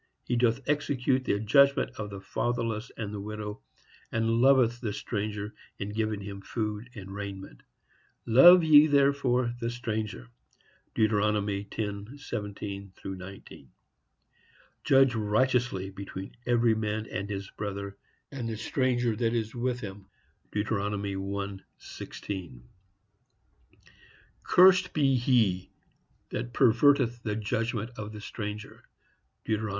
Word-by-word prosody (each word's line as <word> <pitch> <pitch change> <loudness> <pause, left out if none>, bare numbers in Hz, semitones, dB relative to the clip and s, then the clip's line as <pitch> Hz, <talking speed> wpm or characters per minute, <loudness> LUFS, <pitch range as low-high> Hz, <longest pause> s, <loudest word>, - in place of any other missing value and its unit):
He 125 - -1
doth 120 +1 +2
execute 135 -3 +1
the 100 - +1
judgment 140 +6 +4
of 105 -1 -6
the 100 -1 -7
fatherless 115 +2 -2
and 105 -2 -4
the 105 - -4
widow, 105 0 -6 0.5
and 115 +1 +1
loveth 125 -3 +4
the 110 -4 -2
stranger 105 0 -4 0.2
in 100 - -4
giving 110 -1 -2
him 100 0 -7
food 110 +2 -4
and 95 -2 -8
raiment; 100 -9 -7 0.6
love 175 +10 +8
ye 155 -1 +8
therefore 140 -4 +2
the 115 -1 -2
stranger.—Deut. 110 - -4
10:17–19. 100 - -4 1.2
Judge 135 -1 +5
righteously 110 -2 +1
between 95 0 -8
every 120 -1 +4
man 110 0 -2
and 100 -1 -5
his 100 -1 -5
brother, 100 -1 -5 0.4
and 125 -5 -4
the 110 - -4
stranger 120 -1 0
that 115 +1 0
is 110 -1 -2
with 125 0 -2
him.—Deut. 100 +1 -7
1:16. 100 - -5 1.8
Cursed 185 0 +5
be 140 -3 +3
he 115 -8 +2 0.6
that 120 +1 -4
perverteth 120 -1 +4
the 105 -2 -2
judgment 110 +1 -2
of 105 0 -5
the 105 -1 -9
stranger.—Deut. 105 +1 -6
110 Hz, 105 wpm, -28 LUFS, 100-120 Hz, 1.8 s, love